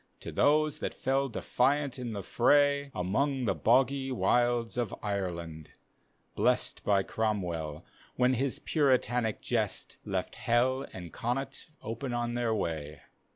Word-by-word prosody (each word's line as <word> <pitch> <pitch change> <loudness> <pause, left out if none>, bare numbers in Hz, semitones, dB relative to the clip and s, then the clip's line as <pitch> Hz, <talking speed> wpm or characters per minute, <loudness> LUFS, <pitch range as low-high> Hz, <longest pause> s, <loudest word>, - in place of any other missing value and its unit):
To - - -6
those 150 0 +3
that - - -3
fell 135 +1 0
defiant 135 +3 0
in 120 -3 -4
the 100 -2 -4
fray. 140 +5 +3
Among 130 +8 0
the 105 - +2
hoggs 135 +3 +2
wilds 120 -2 +1
of 120 -2 -2
Ireland, 85 -6 -4 0.6
blest - - +1
By 100 -2 +3
Cromwell, 90 -9 -2 0.3
when 125 +1 +3
his 130 +1 0
Puritanic 125 -6 +1
jest - - -2
Left - - -3
Hell 130 +3 +1
and 90 -3 -9
Connaught 125 +4 -3 0.2
open 120 +3 -4
on 120 0 -1
their 120 -1 0
way. 80 -7 -3
120 Hz, 130 wpm, -30 LUFS, 100-135 Hz, 0.6 s, those